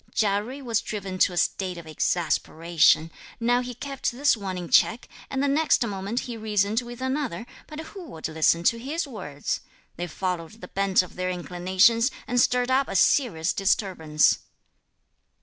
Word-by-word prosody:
Chia 205 Hz, -1 st, +2 dB
Jui 260 Hz, +6 st, -8 dB
was 230 Hz, -3 st, 0 dB
driven 195 Hz, -4 st, -5 dB
to -, -, +4 dB
a -, -, -6 dB
state 185 Hz, 0 st, 0 dB
of 170 Hz, -, -9 dB
exasperation; 165 Hz, 0 st, +1 dB, 0.3 s
now 240 Hz, +1 st, +2 dB
he 250 Hz, -1 st, -6 dB
kept 275 Hz, +2 st, -3 dB
this 280 Hz, +3 st, +2 dB
one 195 Hz, -4 st, -5 dB
in 175 Hz, -1 st, -5 dB
check, 225 Hz, +7 st, +3 dB, 0.2 s
and 270 Hz, 0 st, -1 dB
the -, -, +2 dB
next 290 Hz, -3 st, +3 dB
moment 200 Hz, +3 st, -3 dB
he 240 Hz, -, -6 dB
reasoned 215 Hz, 0 st, 0 dB
with 240 Hz, 0 st, -9 dB
another, 260 Hz, -, -2 dB, 0.2 s
but 305 Hz, 0 st, -8 dB
who 360 Hz, +3 st, -10 dB
would 160 Hz, -, -6 dB
listen 160 Hz, +1 st, +2 dB
to 230 Hz, +6 st, +2 dB
his 300 Hz, +8 st, -3 dB
words? 185 Hz, -, -4 dB, 0.4 s
They 175 Hz, +1 st, -3 dB
followed 175 Hz, 0 st, -3 dB
the 225 Hz, -, -12 dB
bent 195 Hz, -1 st, +2 dB
of 180 Hz, -, -12 dB
their 185 Hz, 0 st, -1 dB
inclinations 185 Hz, +7 st, +2 dB, 0.2 s
and 245 Hz, 0 st, +2 dB
stirred 250 Hz, +1 st, +2 dB
up 270 Hz, +1 st, +3 dB
a -, -, -5 dB
serious 185 Hz, -, +3 dB
disturbance. 180 Hz, -6 st, +2 dB
205 Hz, 170 wpm, -25 LUFS, 180-245 Hz, 0.4 s, to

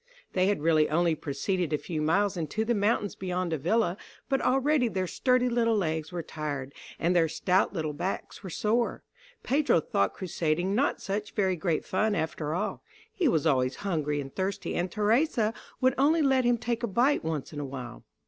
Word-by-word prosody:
They 185 Hz, 0 st, +2 dB
had 200 Hz, -7 st, 0 dB
really 155 Hz, -2 st, +4 dB
only 170 Hz, +1 st, +2 dB
proceeded 160 Hz, +4 st, -2 dB
a -, -, +3 dB
few 155 Hz, 0 st, -4 dB
miles 195 Hz, +6 st, +2 dB
into 175 Hz, +6 st, -2 dB
the 240 Hz, -, +2 dB
mountains 205 Hz, -1 st, +1 dB
beyond 180 Hz, -2 st, -2 dB
Avila, 175 Hz, +5 st, +1 dB, 0.3 s
but 270 Hz, -1 st, +1 dB
already 270 Hz, 0 st, +2 dB
their 190 Hz, -4 st, -1 dB
sturdy 250 Hz, +7 st, +2 dB
little 230 Hz, -2 st, +2 dB
legs 160 Hz, -4 st, -1 dB
were 175 Hz, -2 st, -4 dB
tired, 145 Hz, -4 st, -5 dB, 0.2 s
and 175 Hz, +2 st, +1 dB
their 165 Hz, -2 st, +4 dB
stout 185 Hz, +4 st, +1 dB
little 155 Hz, -5 st, -3 dB
backs 180 Hz, +6 st, -4 dB
were 190 Hz, -, -7 dB
sore. 225 Hz, +7 st, 0 dB, 0.4 s
Pedro 280 Hz, -, +3 dB
thought 100 Hz, -10 st, 0 dB
crusading 175 Hz, +1 st, -1 dB
not 265 Hz, +7 st, +1 dB
such 205 Hz, +2 st, -3 dB
very 190 Hz, -3 st, +2 dB
great 165 Hz, -1 st, -1 dB
fun 210 Hz, +3 st, +1 dB
after 160 Hz, -2 st, -2 dB
all; 205 Hz, +4 st, -2 dB, 0.3 s
he 355 Hz, -, +1 dB
was 160 Hz, -, +2 dB
always 130 Hz, -4 st, +2 dB
hungry 150 Hz, -6 st, 0 dB
and 135 Hz, -1 st, -6 dB
thirsty, 190 Hz, +1 st, -2 dB
and 180 Hz, +1 st, -1 dB
Theresa 225 Hz, -, +2 dB, 0.3 s
would 260 Hz, 0 st, +4 dB
only 310 Hz, +3 st, +4 dB
let 265 Hz, -2 st, +3 dB
him 240 Hz, 0 st, +3 dB
take 235 Hz, 0 st, -2 dB
a 235 Hz, -, 0 dB
bite 245 Hz, +8 st, +2 dB
once 160 Hz, -2 st, -3 dB
in 145 Hz, -, -5 dB
a -, -, -3 dB
while. 125 Hz, -3 st, -7 dB
185 Hz, 185 wpm, -28 LUFS, 155-230 Hz, 0.4 s, really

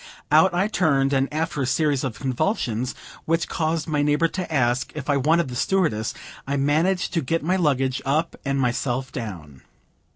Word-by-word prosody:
Out 160 Hz, +5 st, +6 dB
I 180 Hz, +3 st, +1 dB
turned; 140 Hz, -9 st, +2 dB
and, 135 Hz, 0 st, +1 dB
after 155 Hz, -1 st, -2 dB
a 130 Hz, -, 0 dB
series 145 Hz, -1 st, +1 dB
of 130 Hz, -5 st, -3 dB
convulsions, 130 Hz, -, -1 dB, 0.3 s
which 165 Hz, +1 st, +1 dB
caused 160 Hz, -1 st, -1 dB
my 150 Hz, -2 st, 0 dB
neighbor 150 Hz, +3 st, +2 dB
to 185 Hz, -2 st, -5 dB
ask 125 Hz, -3 st, +1 dB
if 150 Hz, -1 st, -2 dB
I 140 Hz, -, +3 dB
wanted 155 Hz, +3 st, +2 dB
the 125 Hz, -, -6 dB
stewardess, 125 Hz, -, 0 dB, 0.3 s
I 140 Hz, +1 st, 0 dB
managed 160 Hz, +8 st, +1 dB
to 165 Hz, -, +1 dB
get 165 Hz, +4 st, -1 dB
my 180 Hz, +4 st, +1 dB
luggage 135 Hz, -7 st, +1 dB
up 150 Hz, +5 st, 0 dB
and 140 Hz, -1 st, -1 dB
myself 130 Hz, +1 st, -1 dB
down. 85 Hz, -, -7 dB
145 Hz, 175 wpm, -23 LUFS, 130-165 Hz, 0.3 s, Out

